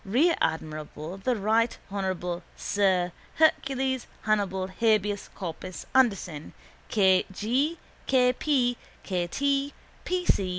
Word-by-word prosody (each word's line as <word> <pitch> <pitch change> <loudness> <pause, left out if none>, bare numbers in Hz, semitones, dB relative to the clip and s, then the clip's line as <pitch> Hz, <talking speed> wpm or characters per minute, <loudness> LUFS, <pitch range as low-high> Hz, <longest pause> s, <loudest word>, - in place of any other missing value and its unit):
rear 265 - +3
admiral, 155 +1 -3
the 255 - +2
right 220 +3 +2
honourable 185 -3 -2
sir 185 -3 +1 0.2
Hercules 270 -4 +2 0.2
Hannibal 200 -3 +1
Habeas 205 +1 +1
Corpus 185 0 -6
Anderson, 195 - +1 0.4
K. 190 -3 +4
G., 260 - 0 0.3
K. 250 -1 +4
P., 250 -3 +1 0.3
K. 180 -3 -1
T., 280 +5 0 0.3
P. 360 0 -1
210 Hz, 100 wpm, -27 LUFS, 185-260 Hz, 0.4 s, K